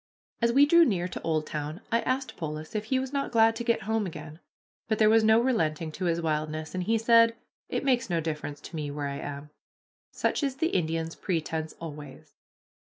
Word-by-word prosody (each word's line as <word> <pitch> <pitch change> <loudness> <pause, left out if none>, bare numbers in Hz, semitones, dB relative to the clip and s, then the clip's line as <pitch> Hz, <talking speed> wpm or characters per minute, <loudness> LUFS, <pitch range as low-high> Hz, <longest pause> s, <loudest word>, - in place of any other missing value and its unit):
As 235 0 +3
we 275 +4 +6
drew 335 +3 +6
near 185 - +1
to - - -7
Oldtown 155 0 -2
I 230 0 +3
asked 260 0 -2
Polis 155 0 -6
if 215 -1 -2
he 260 +4 +1
was 265 +1 -3
not 280 -1 -1
glad 225 -1 +4
to 235 - -4
get 235 -1 +1
home 220 0 0
again; 155 -1 -9 0.5
but 220 -2 0
there 215 0 +5
was 225 0 +5
no 220 +1 +6
relenting 165 -11 0
to 185 +4 -4
his 170 -1 +1
wildness, 155 -1 -2
and 185 -1 -2
he 225 +3 +2
said, 230 0 +5 0.3
"It - - -2
makes 245 -5 +2
no 170 -2 +1
difference 150 -2 -4
to - - -9
me 150 -2 -3
where 145 0 -3
I 140 0 -4
am." 145 +1 -7 0.6
Such - - 0
is 275 -3 -1
the 320 +5 0
Indian's 165 -1 -1
pretense 160 -3 -3
always. 150 -4 -9
175 Hz, 205 wpm, -28 LUFS, 155-230 Hz, 0.6 s, we